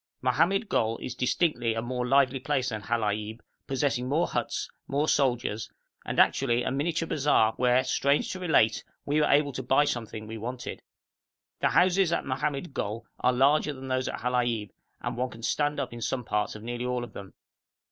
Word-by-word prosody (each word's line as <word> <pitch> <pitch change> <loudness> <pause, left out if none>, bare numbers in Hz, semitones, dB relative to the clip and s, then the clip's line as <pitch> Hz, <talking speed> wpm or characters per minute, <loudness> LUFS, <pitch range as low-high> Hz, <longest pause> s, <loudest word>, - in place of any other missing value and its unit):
Mohammed 170 - +2
Gol 115 - +1
is 125 - -5
distinctly 125 -3 0
a 115 - -1
more 125 0 -2
lively 135 0 +3
place 130 -1 0
than 110 -2 -4
Halaib, 110 0 -2 0.3
possessing 130 -2 0
more 160 +5 +2
huts, - - -2 0.2
more 145 +3 0
soldiers, 120 -7 +1 0.3
and - - -2
actually 120 -2 +3
a - - -1
miniature 160 +4 -1
bazaar 140 -8 +3
where, 125 +1 +3
strange 140 +2 +1
to 185 - -5
relate, 115 -11 +3 0.2
we 150 +2 +2
were 150 - +3
able 145 0 +3
to 130 - -4
buy 135 +3 +3
something 110 -4 -4
we 110 +1 -7
wanted. 125 +2 -5 0.8
The - - +2
houses 185 -1 +3
at - - 0
Mohammed 140 +3 -2
Gol 110 0 -3
are 125 - +3
larger 140 +4 +3
than 130 -1 -8
those 130 0 0
at - - -4
Halaib, 120 -4 0 0.3
and - - -3
one 125 +1 -1
can 115 -1 -12
stand 145 +4 0
up - - -3
in 120 - -8
some 125 +2 -2
parts 105 -1 -1
of 105 - -9
nearly 120 +1 -4
all 125 -1 -1
of 120 - -9
them. 100 -2 -10
125 Hz, 190 wpm, -28 LUFS, 115-145 Hz, 0.8 s, lively